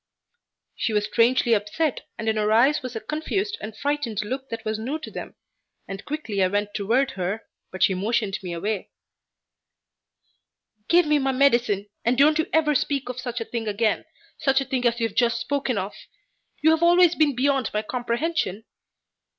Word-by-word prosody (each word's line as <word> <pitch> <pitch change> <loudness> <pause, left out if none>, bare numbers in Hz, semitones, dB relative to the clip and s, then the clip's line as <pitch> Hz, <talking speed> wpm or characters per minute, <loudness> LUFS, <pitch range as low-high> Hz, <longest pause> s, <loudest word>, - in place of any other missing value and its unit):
She 225 - -1
was 210 0 +2
strangely 235 +2 +3
upset 225 +8 -1
and 225 - -5
in 220 - +2
her 215 0 +1
eyes 260 +7 +4
was 255 -2 -6
a - - -2
confused 315 - -2
and 215 0 -7
frightened 285 -8 -1
look 265 +4 -5
that 230 -1 -6
was 215 0 -2
new 260 +8 -3
to 315 - -9
them, - - -7 0.5
and 195 0 -7
quickly 280 -10 -3
I 185 - +4
went 205 +2 -1
toward 235 +7 +1
her, 195 +4 -3 0.3
but 185 - -1
she 190 - +4
motioned 205 +1 -1
me 180 -2 -6
away. 195 +4 -3 2.0
"Give 345 0 +5
me 300 -1 +3
my 270 -1 0
medicine, 240 -7 +2 0.2
and 240 +2 +2
don't 305 +3 +5
ever 310 -1 +3
speak 275 -1 -1
of 250 0 -5
such 245 -1 -4
a - - -3
thing 230 -1 -4
again 215 +1 0 0.3
such 270 -3 +3
a 275 - -2
thing 255 -2 0
as 235 0 0
you 230 - +1
have 210 - -14
just 235 -1 +2
spoken 270 -2 -1
of! 195 +1 -3 0.7
You 315 - +6
have 320 0 +2
always 345 0 +6
been 300 -5 +2
beyond 270 -2 +1
my 210 0 -1
comprehension." 240 - -2
240 Hz, 185 wpm, -24 LUFS, 215-285 Hz, 2.0 s, You